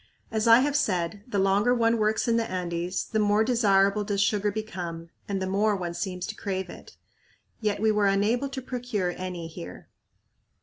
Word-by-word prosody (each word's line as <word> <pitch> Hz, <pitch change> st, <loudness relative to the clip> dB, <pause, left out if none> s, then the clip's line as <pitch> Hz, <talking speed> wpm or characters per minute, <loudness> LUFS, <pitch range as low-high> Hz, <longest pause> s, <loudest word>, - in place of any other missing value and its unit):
As 220 Hz, +1 st, 0 dB
I 230 Hz, +2 st, +8 dB
have 285 Hz, +1 st, 0 dB
said, 200 Hz, -7 st, 0 dB
the 210 Hz, -, -2 dB
longer 200 Hz, +5 st, +3 dB
one 230 Hz, -1 st, +2 dB
works 215 Hz, +2 st, +1 dB
in 230 Hz, -, +3 dB
the 230 Hz, -1 st, 0 dB
Andes 180 Hz, 0 st, -2 dB
the 220 Hz, -, -1 dB
more 210 Hz, +1 st, +3 dB
desirable 205 Hz, -4 st, +3 dB
does 205 Hz, -1 st, -2 dB
sugar 205 Hz, 0 st, +2 dB
become 175 Hz, -6 st, -6 dB, 0.2 s
and 195 Hz, -1 st, -1 dB
the 190 Hz, -, -2 dB
more 205 Hz, +3 st, +1 dB
one 175 Hz, -3 st, -4 dB
seems 180 Hz, 0 st, -4 dB
to 220 Hz, -, -6 dB
crave 190 Hz, -3 st, -4 dB
it. -, -, -13 dB, 0.6 s
Yet 210 Hz, -2 st, -1 dB
we 220 Hz, +1 st, +3 dB
were 210 Hz, -1 st, +2 dB
unable 215 Hz, +7 st, +1 dB
to 265 Hz, -1 st, -6 dB
procure 245 Hz, -8 st, -2 dB
any 180 Hz, -2 st, -5 dB
here. 90 Hz, -, -10 dB
205 Hz, 185 wpm, -26 LUFS, 185-220 Hz, 0.6 s, I